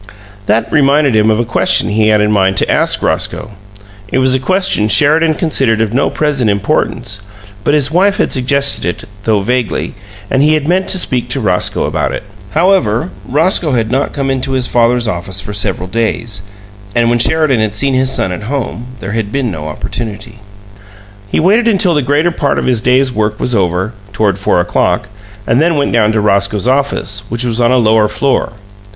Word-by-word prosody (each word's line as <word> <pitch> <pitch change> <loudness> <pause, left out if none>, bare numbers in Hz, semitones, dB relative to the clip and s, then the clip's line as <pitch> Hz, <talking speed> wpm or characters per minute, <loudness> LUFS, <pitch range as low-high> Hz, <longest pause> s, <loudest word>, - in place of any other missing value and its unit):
That 110 +2 0
reminded 140 -3 +3
him 110 0 +3
of 110 0 +1
a 120 - 0
question 115 - +2
he 110 +1 +1
had 105 -1 +3
in 105 0 +1
mind 95 -2 +1
to - - +1
ask - - +1
Roscoe. 110 - -2 0.6
It 100 - -2
was 130 0 +3
a 130 - +1
question 185 - 0
Sheridan 155 +8 +3
considered 135 - 0
of 110 -1 -1
no 135 - +1
present 140 -7 0
importance, 100 0 -1 0.4
but 145 - +2
his 145 -1 0
wife 195 +4 +2
had - - 0
suggested 140 +1 +1 0.2
it - - -13 0.2
though 110 -3 +2
vaguely 125 +1 -2 0.3
and 135 - +1
he 155 +2 +3
had 150 -1 -2
meant 185 +2 +1
to - - +2
speak 125 -8 -1
to 135 - -2
Roscoe 95 -6 0
about - - -1
it. - - -5 0.3
However, 140 - +1 0.2
Roscoe 160 +2 +1
had 115 -2 -1
not 135 +2 0
come 135 -2 -2
into 135 0 -2
his 130 -1 +2
father's 120 0 +1
office 95 -1 -2
for 100 +1 -4
several 100 -3 -1
days, 115 0 -2 0.5
and 120 -1 +2
when 120 - +1
Sheridan 155 -2 +3
had 110 -1 -1
seen 135 +4 +2
his 130 0 +2
son 115 -8 +2
at 90 - -5
home 125 -3 -4
there 95 - -5
had 110 -2 -3
been 130 -4 -1
no 75 -3 -6
opportunity. 110 +7 -6 0.9
He - - +1
waited 215 +8 +3
until 195 -5 +2
the 150 - +1
greater 145 +6 +1
part 145 -4 -1
of - - -2
his 125 -4 +1
day's 130 +2 +2
work 105 -2 -2
was 125 - 0
over, 95 +1 0 0.2
toward 100 -1 0
four 95 - +1
o'clock, 90 +3 0 0.4
and 120 +5 +2
then 165 0 +2
went 140 -1 0
down 110 -2 +2
to 110 - +1
Roscoe's 100 +1 0
office, 130 -6 0
which 115 +2 -2
was 120 0 -1
on 120 +1 +3
a 130 - +3
lower 110 -2 +3
floor. 110 +4 -1
120 Hz, 195 wpm, -13 LUFS, 105-140 Hz, 0.9 s, reminded